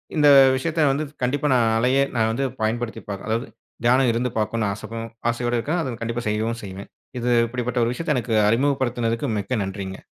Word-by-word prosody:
இந்த 150 Hz, -2 st, +4 dB, 0.3 s
விஷயத்த 155 Hz, +3 st, 0 dB
வந்து 145 Hz, +3 st, -1 dB, 0.2 s
கண்டிப்பா 140 Hz, +4 st, 0 dB
நான் 120 Hz, -3 st, +3 dB
அலையே 130 Hz, +4 st, +3 dB
நான் 110 Hz, -1 st, +2 dB
வந்து 125 Hz, +5 st, -1 dB, 0.2 s
பயன்படுத்தி 115 Hz, +1 st, -2 dB
பார்க்குறேன். 100 Hz, +1 st, -6 dB
அதாவது 115 Hz, +2 st, -1 dB, 0.4 s
தியானம் 125 Hz, +1 st, +4 dB
இருந்து 120 Hz, +2 st, -1 dB
பார்க்கணும் 110 Hz, -1 st, 0 dB
ஆசைதா 115 Hz, +3 st, -7 dB, 0.3 s
ஆசையோட 120 Hz, +1 st, -1 dB
இருக்கேன். 155 Hz, +9 st, -1 dB
அத 130 Hz, -6 st, -3 dB
கண்டிப்பா 115 Hz, +1 st, -3 dB
செய்யவும் 110 Hz, +2 st, -1 dB
செய்வேன். 95 Hz, 0 st, -8 dB, 0.3 s
இது 120 Hz, +1 st, 0 dB, 0.2 s
இப்டிப்பட்ட 125 Hz, 0 st, -2 dB
ஒரு 115 Hz, -, +1 dB
விஷயத்த 150 Hz, +2 st, -1 dB
எனக்கு 115 Hz, -2 st, -1 dB
அறிமுகப்படுத்தினதுக்கு, 120 Hz, -1 st, 0 dB
மிக்க 100 Hz, +2 st, -2 dB
நன்றிங்க! 95 Hz, -1 st, -6 dB
120 Hz, 170 wpm, -23 LUFS, 115-130 Hz, 0.4 s, இந்த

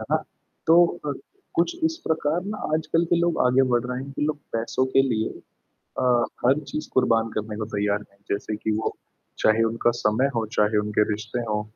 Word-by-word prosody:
है -, -, -5 dB
ना? -, -, +2 dB, 0.4 s
तो 165 Hz, +1 st, +6 dB, 0.3 s
अ, 145 Hz, -, 0 dB, 0.4 s
कुछ 340 Hz, -, +1 dB
इस 325 Hz, 0 st, +1 dB
प्रकार 160 Hz, +1 st, +1 dB
ना 210 Hz, +1 st, -4 dB, 0.2 s
आजकल 165 Hz, +2 st, +1 dB
के 175 Hz, -, +5 dB
लोग 170 Hz, 0 st, +1 dB
आगे 130 Hz, +2 st, +4 dB
बढ़ 120 Hz, -1 st, +2 dB
रहे 125 Hz, +1 st, -3 dB
हैं 140 Hz, -, -8 dB
कि -, -, -4 dB
लोग 150 Hz, 0 st, 0 dB, 0.2 s
पैसों 115 Hz, +3 st, 0 dB
के 135 Hz, -, +7 dB
लिए 115 Hz, -5 st, 0 dB, 0.7 s
अ, -, -, +1 dB, 0.4 s
हर 135 Hz, +4 st, +4 dB
चीज़ 155 Hz, -, -4 dB
कुर्बान 115 Hz, -3 st, +3 dB
करने 105 Hz, 0 st, -3 dB
को 110 Hz, -, -3 dB
तैयार 100 Hz, 0 st, +1 dB
हैं, 100 Hz, -, -27 dB
जैसे 100 Hz, +1 st, -2 dB
कि 110 Hz, +1 st, -2 dB
वो 110 Hz, -, -2 dB, 0.4 s
चाहे 110 Hz, +1 st, +4 dB
उनका 115 Hz, +1 st, +1 dB
समय 110 Hz, +6 st, +2 dB
हो, 115 Hz, -1 st, 0 dB
चाहे 105 Hz, 0 st, +3 dB
उनके 105 Hz, 0 st, +2 dB
रिश्ते 110 Hz, +3 st, -3 dB
हो 105 Hz, 0 st, 0 dB
115 Hz, 200 wpm, -24 LUFS, 110-145 Hz, 0.7 s, के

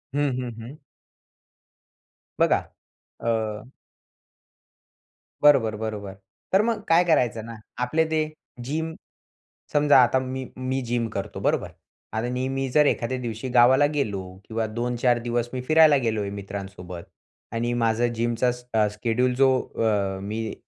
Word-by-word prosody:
हं, 145 Hz, 0 st, +2 dB
हं, 125 Hz, -1 st, -4 dB
हं. 125 Hz, +6 st, -9 dB, 1.6 s
बघा -, -, +4 dB, 0.6 s
अ 115 Hz, -, 0 dB, 2.1 s
बरोबर, 130 Hz, -7 st, +5 dB
बरोबर. 105 Hz, -2 st, -5 dB, 0.4 s
तर 195 Hz, -, +6 dB
मग 225 Hz, -1 st, 0 dB
काय 165 Hz, +2 st, +5 dB
करायचं 120 Hz, -10 st, +1 dB
ना, 115 Hz, 0 st, -8 dB, 0.3 s
आपले 155 Hz, +6 st, +2 dB
ते 155 Hz, -1 st, +2 dB, 0.4 s
जिम 160 Hz, +2 st, -2 dB, 0.8 s
समजा 145 Hz, -2 st, +6 dB
आता 130 Hz, +2 st, +2 dB
मी 130 Hz, 0 st, -4 dB
मी 130 Hz, +1 st, -2 dB
जिम 120 Hz, -1 st, +1 dB
करतो, 100 Hz, -1 st, -5 dB
बरोबर. -, -, 0 dB, 0.4 s
आता 115 Hz, +3 st, -1 dB
मी 135 Hz, +1 st, -2 dB
जर 150 Hz, +3 st, +4 dB
एखाद्या 130 Hz, 0 st, 0 dB
दिवशी 120 Hz, +1 st, -5 dB
गावाला 125 Hz, +3 st, +5 dB
गेलो 105 Hz, -9 st, -1 dB, 0.2 s
किंवा 110 Hz, 0 st, -2 dB
2-4 120 Hz, 0 st, +1 dB
दिवस 120 Hz, 0 st, -1 dB
मी 125 Hz, -, -3 dB
फिरायला 155 Hz, -2 st, +6 dB
गेलोय 105 Hz, -3 st, -1 dB
मित्रांसोबत 95 Hz, -3 st, -7 dB, 0.5 s
आणि 120 Hz, +1 st, -1 dB
माझं 115 Hz, 0 st, +1 dB
जिमचा 120 Hz, +1 st, +1 dB
स 125 Hz, 0 st, -9 dB, 0.3 s
स्केड्यूल 120 Hz, +4 st, 0 dB
जो 135 Hz, +1 st, +5 dB, 0.3 s
अ, 100 Hz, -4 st, 0 dB
मी 110 Hz, +2 st, -4 dB
120 Hz, 130 wpm, -25 LUFS, 110-135 Hz, 2.1 s, तर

